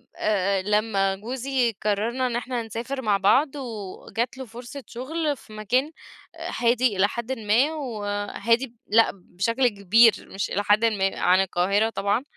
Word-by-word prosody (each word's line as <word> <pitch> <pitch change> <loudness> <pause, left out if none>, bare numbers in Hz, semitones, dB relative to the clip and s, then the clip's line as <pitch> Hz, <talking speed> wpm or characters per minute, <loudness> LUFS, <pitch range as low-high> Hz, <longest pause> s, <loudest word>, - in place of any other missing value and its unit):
آآ، 195 -2 +1
لمّا 200 -1 +1
جوزي 245 +3 -1
قررنا 225 +5 0
إن 240 - -3
إحنا 245 -1 -2
نسافر 235 +5 -5
مع 210 -4 +2
بعض 265 +9 +3
وجات 230 0 -5
له 265 - -6
فرصة 240 +4 -9
شغل 295 +4 -3
في 215 - -16
مكان 250 +8 0 0.7
هادي 240 -2 +2
إلى 195 +1 +4
حدٍ 235 +4 -5
ما، 225 +8 +2
وهادي 230 -2 -1
ب 235 - -25
لأ 225 +2 +4
بشكل 215 +7 -1
كبير 215 +2 +5 0.2
مش 195 - -3
إلى 205 - 0
حدٍ 210 +3 +3
ما 195 -3 0
عن 185 +1 +4
القاهرة 195 +4 +1
طبعًا. 205 +2 0
225 Hz, 150 wpm, -24 LUFS, 200-250 Hz, 0.7 s, كبير